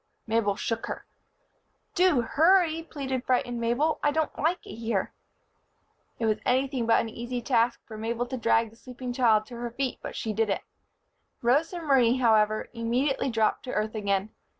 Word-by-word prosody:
Mabel 220 -3 +1
shook 230 +3 -3
her. - - -6 0.9
"Do 355 -8 +4
hurry," 330 +5 +3
pleaded 270 -5 -4
frightened 245 -2 0
Mabel. 250 +7 +1
"I 295 - +3
don't 310 +1 -1
like 335 +4 0
it - - -9
here." 225 -4 -2 1.0
It 230 - -1
was 215 -1 +1
anything 260 -1 +1
but 230 - +5
an - - -4
easy 240 +2 -5
task 235 -1 +1
for 220 - -9
Mabel 230 +2 -2
to 260 - -5
drag 230 -1 +2
the - - -18
sleeping 250 +1 -7
child 225 -4 +3
to 240 +1 -10
her 240 0 -4
feet, 260 +2 -3
but - - -7
she 220 - -3
did 220 0 +1
it. 195 - -1 0.8
Rosa 305 +9 +2
Marie, 260 -6 +4
however, 215 -3 +3
immediately 245 +4 0
dropped 225 -2 +1
to 250 - -5
earth 215 +1 -1
again. 200 -1 -1
240 Hz, 175 wpm, -27 LUFS, 225-270 Hz, 1.0 s, but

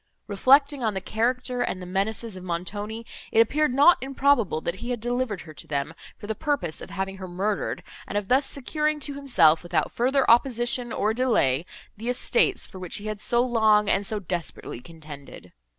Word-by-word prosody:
Reflecting 275 +6 +3
on 215 -3 0
the - - 0
character 245 +4 -1
and 185 - -2
the 180 - -7
menaces 200 +4 -2
of 185 - -9
Montoni, 205 +6 -4 0.3
it 220 - +3
appeared 295 +6 +3
not 290 +7 +6
improbable, 265 - +1
that 170 +3 -3
he 240 - -6
had 245 -2 -2
delivered 240 -3 -2
her 155 0 -11
to - - -11
them, 145 +1 -2 0.2
for - - -10
the 220 - -2
purpose 280 - -2
of - - -9
having 195 0 -4
her 190 -1 -7
murdered, 195 +4 -2 0.2
and 205 - -2
of 205 -2 -2
thus 265 +4 +3
securing 300 +3 -1
to 285 0 -3
himself, 245 - +4
without 170 -3 -1
further 260 +3 +1
opposition, 240 0 +2
or 215 +1 0
delay, 180 - +1 0.3
the 230 +4 -4
estates, 395 - +1
for 190 - -11
which 180 -2 -3
he 205 - -3
had 215 -1 -4
so 240 +3 +1
long 220 -4 +3
and 195 - +2
so 215 - -1
desperately 175 -9 -5
contended. 150 -1 -12
220 Hz, 190 wpm, -25 LUFS, 185-255 Hz, 0.3 s, not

